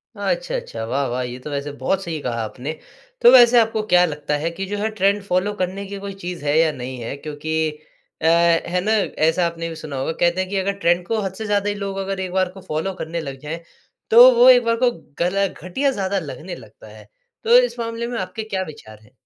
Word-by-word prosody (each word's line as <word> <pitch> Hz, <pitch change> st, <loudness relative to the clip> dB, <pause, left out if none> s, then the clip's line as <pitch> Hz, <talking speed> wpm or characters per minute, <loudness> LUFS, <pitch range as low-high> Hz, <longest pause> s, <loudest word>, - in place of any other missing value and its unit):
अ, -, -, -13 dB
अच्छा, -, -, -2 dB
अच्छा, 480 Hz, -, -5 dB
वाह, 135 Hz, +4 st, -1 dB
वाह 125 Hz, +1 st, -2 dB
ये 125 Hz, +1 st, -6 dB
तो 150 Hz, -, -8 dB
वैसे 140 Hz, 0 st, -3 dB
बहुत 190 Hz, +8 st, 0 dB
सही 165 Hz, -2 st, -4 dB
कहा 120 Hz, -3 st, -2 dB
आपने। 125 Hz, +7 st, -5 dB, 0.5 s
तो 240 Hz, -, +8 dB
वैसे 240 Hz, -1 st, +8 dB
आपको 220 Hz, -1 st, +1 dB
क्या 180 Hz, 0 st, +5 dB
लगता 150 Hz, -2 st, -3 dB
है 165 Hz, -, +1 dB
कि 190 Hz, +3 st, -5 dB
जो 205 Hz, +2 st, -4 dB
है 215 Hz, +2 st, -1 dB
ट्रेंड 200 Hz, +1 st, +3 dB
फॉलो 200 Hz, +2 st, 0 dB
करने 190 Hz, +2 st, -2 dB
की 200 Hz, 0 st, -7 dB
कोई 200 Hz, -, -5 dB
चीज़ 175 Hz, -4 st, -5 dB
है 145 Hz, +1 st, +2 dB
या 160 Hz, -1 st, +4 dB
नहीं 130 Hz, -1 st, -7 dB
है? 115 Hz, +4 st, -5 dB
क्योंकि 155 Hz, +2 st, -2 dB, 0.5 s
अ, -, -, -2 dB
है 170 Hz, +1 st, +3 dB
ना 215 Hz, -, 0 dB, 0.3 s
ऐसा 165 Hz, +2 st, +2 dB
आपने 165 Hz, 0 st, -5 dB
भी 165 Hz, -, -7 dB
सुना 150 Hz, -3 st, -7 dB
होगा 135 Hz, +4 st, -2 dB
कहते 175 Hz, +3 st, +1 dB
हैं 185 Hz, -, -4 dB
कि 200 Hz, -, -4 dB
अगर 195 Hz, +1 st, 0 dB
ट्रेंड 175 Hz, -1 st, +2 dB
को 225 Hz, -, 0 dB
हद 190 Hz, -1 st, -3 dB
से 220 Hz, -, -6 dB
ज़्यादा 205 Hz, -1 st, +1 dB
ही 205 Hz, -, -2 dB
लोग 200 Hz, -1 st, -4 dB
अगर 195 Hz, 0 st, -3 dB
एक 185 Hz, -1 st, -4 dB
बार 185 Hz, -1 st, +1 dB
को 190 Hz, 0 st, -12 dB
फॉलो 185 Hz, +2 st, -3 dB
करने 170 Hz, -1 st, -5 dB
लग 135 Hz, -3 st, -7 dB
जाएँ, 155 Hz, +3 st, -6 dB, 0.5 s
तो 240 Hz, +3 st, +9 dB
वो 245 Hz, +2 st, +7 dB
एक 245 Hz, -1 st, +7 dB
बार 230 Hz, 0 st, +1 dB
को 245 Hz, -, +5 dB, 0.3 s
गल 195 Hz, +3 st, +1 dB
घटिया 230 Hz, +11 st, -2 dB
ज़्यादा 195 Hz, -4 st, -1 dB
लगने 160 Hz, +2 st, -7 dB
लगता -, -, -15 dB
है। -, -, -15 dB, 0.4 s
तो 470 Hz, +2 st, +6 dB
इस -, -, -1 dB
मामले 230 Hz, 0 st, -3 dB
में 240 Hz, 0 st, -4 dB
आपके 185 Hz, +4 st, -5 dB
क्या 195 Hz, -3 st, -3 dB
विचार 110 Hz, -8 st, -12 dB
हैं? 110 Hz, +3 st, -22 dB
185 Hz, 245 wpm, -21 LUFS, 155-205 Hz, 0.5 s, तो